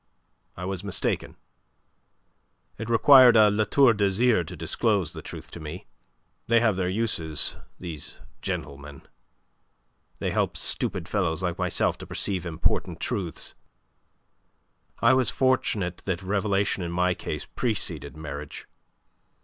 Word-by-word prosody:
I 90 - -5
was 95 0 -4
mistaken. 100 -2 -2 1.4
It 115 +1 -5
required 120 +1 +7
a 105 -1 +6
La 105 +1 +1
Tour 125 +3 +5
d'Azyr 105 +1 +2
to 90 - -7
disclose 85 +2 0
the 80 - -7
truth 80 0 -9
to - - -8
me. 80 +3 -8 0.6
They 115 0 +4
have 110 -4 +2
their 90 -1 -1
uses, 95 -7 +1 0.2
these 85 -5 -8 0.2
gentlemen. 70 0 -6 1.1
They - - -2
help - - 0
stupid - - -2
fellows 80 +3 -1
like 90 -2 -2
myself - - 0
to - - -9
perceive 95 -4 -2
important 80 -1 -1
truths. 90 -5 -4 1.5
I 115 +2 +6
was 130 -1 +3
fortunate 110 -9 0
that 95 -1 -2
revelation 100 0 0
in 85 -1 -3
my 90 +1 +1
case - - -5
preceded 80 - -3
marriage. 75 -1 -7
95 Hz, 125 wpm, -26 LUFS, 85-110 Hz, 1.5 s, required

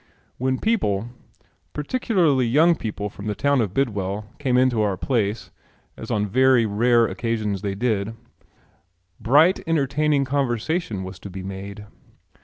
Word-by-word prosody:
When 130 +1 0
people, 120 - 0 0.6
particularly 155 - +1
young 155 +8 +4
people 105 -6 -4
from 100 0 -9
the 105 - -2
town 140 +1 +2
of 105 -5 -1
Bidwell, 105 -4 -2
came 130 -4 +1
into 125 -3 +3
our 100 -3 0
place, 110 -3 -1 0.4
as - - -9
on 105 -1 0
very 130 +3 +4
rare 115 +3 +3
occasions 110 -4 -2
they 100 -1 -3
did, 110 -1 -1 1.0
bright 155 - +4
entertaining 150 -2 +1
conversation 130 - -1
was 95 0 -8
to 100 - -9
be 95 0 -7
made. 100 +2 -7
115 Hz, 135 wpm, -23 LUFS, 105-140 Hz, 1.0 s, young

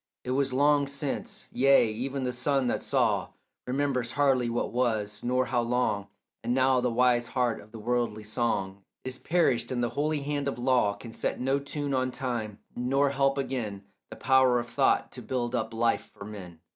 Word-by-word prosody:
It 125 - -3
was 135 0 +1
long 145 +2 +3
since: 140 0 -4
yea, 135 -1 +5
even 130 +5 -3
the 125 - 0
sun 135 +2 +1
that 120 - 0
saw - - +1 0.3
Remembers 130 -2 -1
hardly 135 -4 +2
what 115 - -1
was, 110 -4 -1
nor 125 +1 +1
how 120 -1 +1
long. 120 -4 0 0.4
And 120 +2 0
now 130 -1 +3
the 125 - +1
wise 120 0 +2
heart 125 -2 0
of 105 - -17
the 115 - -9
worldly 115 -1 -1
song 100 -3 -2 0.2
Is 130 0 -4
perished, 130 -9 +1
and 120 -1 0
the 120 - +1
holy 150 0 0
hand 145 0 -2
of 140 - -2
law 120 -5 +2
Can 115 +3 -10
set - - -2
no 135 +2 +1
tune 140 0 -4
on 130 -1 +1
time, 120 -5 -4 0.2
nor 135 +3 +1
help 135 0 +2
again 115 -7 -3 0.3
The - - -8
power 130 -2 +4
of 120 - -4
thought - - +2
to - - -9
build 125 -2 -2
up 120 -2 -1
life 115 +1 0
for 100 - -9
men. 90 -6 -9
125 Hz, 190 wpm, -28 LUFS, 115-135 Hz, 0.4 s, yea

